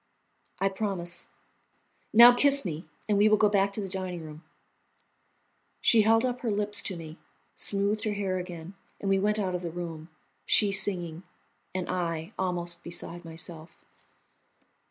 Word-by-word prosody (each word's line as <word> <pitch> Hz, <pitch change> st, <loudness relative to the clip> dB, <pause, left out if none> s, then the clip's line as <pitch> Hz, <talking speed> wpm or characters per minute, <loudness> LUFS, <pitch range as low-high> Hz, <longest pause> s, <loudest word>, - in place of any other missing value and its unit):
"I 195 Hz, -, +1 dB
promise." 190 Hz, -3 st, -4 dB, 0.8 s
"Now, 235 Hz, +2 st, +9 dB
kiss 280 Hz, 0 st, +4 dB
me, 165 Hz, -1 st, -5 dB, 0.2 s
and 205 Hz, -2 st, +2 dB
we 210 Hz, +1 st, +5 dB
will 215 Hz, -, +5 dB
go 210 Hz, -, +4 dB
back 200 Hz, -1 st, +2 dB
to 210 Hz, -, -3 dB
the 195 Hz, -, -4 dB
dining 185 Hz, -2 st, -5 dB
room." 155 Hz, +1 st, -11 dB, 1.4 s
She 230 Hz, -, +5 dB
held 225 Hz, +3 st, +4 dB
up 250 Hz, -1 st, -2 dB
her 235 Hz, -, -1 dB
lips 205 Hz, 0 st, +3 dB
to 190 Hz, -, -4 dB
me, 160 Hz, 0 st, -10 dB, 0.3 s
smoothed 205 Hz, +1 st, +1 dB
her 215 Hz, -, 0 dB
hair 195 Hz, -2 st, -2 dB
again, 175 Hz, 0 st, -8 dB, 0.3 s
and 195 Hz, -, -1 dB
we 195 Hz, -, +3 dB
went 210 Hz, +2 st, +1 dB
out 190 Hz, -3 st, -1 dB
of 180 Hz, -, -2 dB
the 175 Hz, -, -4 dB
room, 165 Hz, -1 st, -7 dB, 0.3 s
she 205 Hz, -2 st, +3 dB
singing, 180 Hz, -4 st, -1 dB, 0.5 s
and 185 Hz, -1 st, -2 dB
I 170 Hz, 0 st, -3 dB
almost 175 Hz, -2 st, -2 dB
beside 175 Hz, 0 st, -6 dB
myself. 165 Hz, 0 st, -8 dB
190 Hz, 155 wpm, -28 LUFS, 170-210 Hz, 1.4 s, Now